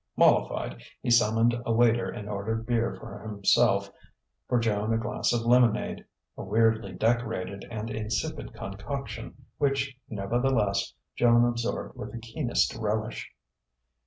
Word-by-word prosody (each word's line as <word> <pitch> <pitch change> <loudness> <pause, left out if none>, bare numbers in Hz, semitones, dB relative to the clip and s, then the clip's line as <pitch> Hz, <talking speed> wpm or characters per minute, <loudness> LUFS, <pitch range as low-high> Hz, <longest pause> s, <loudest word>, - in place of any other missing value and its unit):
Mollified, - - +2 0.2
he - - 0
summoned 115 +1 +4
a 115 - -1
waiter 115 0 +3
and 105 - -6
ordered 110 +2 -3
beer 115 -1 0
for - - -9
himself, 105 -2 +2 0.6
for 125 - +3
Joan 110 -1 0
a 115 - +3
glass 115 +1 -1
of 120 -1 +1
lemonade 120 -1 +3 0.3
a - - -7
weirdly 110 0 +2
decorated 110 -3 -1
and 110 0 -5
insipid 110 0 -3
concoction 105 +8 -6
which, 135 -2 0
nevertheless, 105 -1 0 0.2
Joan 120 0 +5
absorbed 120 -1 -2
with - - -7
the 120 - -5
keenest 120 +3 0
relish. 110 +1 -3
115 Hz, 130 wpm, -28 LUFS, 105-120 Hz, 0.6 s, Joan